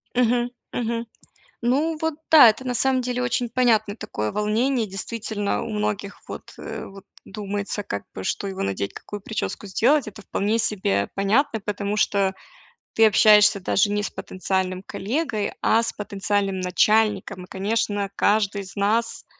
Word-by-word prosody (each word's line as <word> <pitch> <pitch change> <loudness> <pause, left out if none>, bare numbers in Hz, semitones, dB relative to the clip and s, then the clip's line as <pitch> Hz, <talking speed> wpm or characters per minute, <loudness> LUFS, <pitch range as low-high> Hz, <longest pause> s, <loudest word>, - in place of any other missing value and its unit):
Мгм. 245 0 +2 0.2
Мгм. 235 0 -2 0.6
Ну, 295 +7 +1
вот 320 -2 0 0.2
да, 295 -8 +10
это 260 +5 -3
на 250 - -1
самом 260 +1 +2
деле 250 0 -2
очень 245 -1 0
понятное 225 -4 +2
такое 105 - -4
волнение. 220 +3 +1
Действительно, 205 +1 -3
у - - -6
многих 210 -1 -3
вот, - - -9
э, - - -6
вот 195 0 -12 0.2
думается 205 0 -4
как 100 - -4
бы 95 - -6
что 200 - -2
его 190 -1 -4
надеть, 100 0 -2
какую 205 -1 -8
причёску 210 -1 -4
сделать- 255 +8 +2
это 210 0 -9
вполне 210 +3 0
себе 185 - 0
понятно, 220 +5 +1
потому 205 0 -3
что 200 -2 +2 0.6
ты 225 0 +6
общаешься 210 -1 +6
даже 195 +2 +2
не 205 0 0
с - - -3
потенциальным 185 0 -2
коллегой, 220 +2 -2
а 225 - +4
с 230 - -2
потенциальным 195 -1 -2
начальником. 200 0 +2
И, - - -15
конечно, 205 0 -1
каждый 205 -1 +1
из 190 - -12
нас 220 +3 0
210 Hz, 155 wpm, -23 LUFS, 195-230 Hz, 0.6 s, да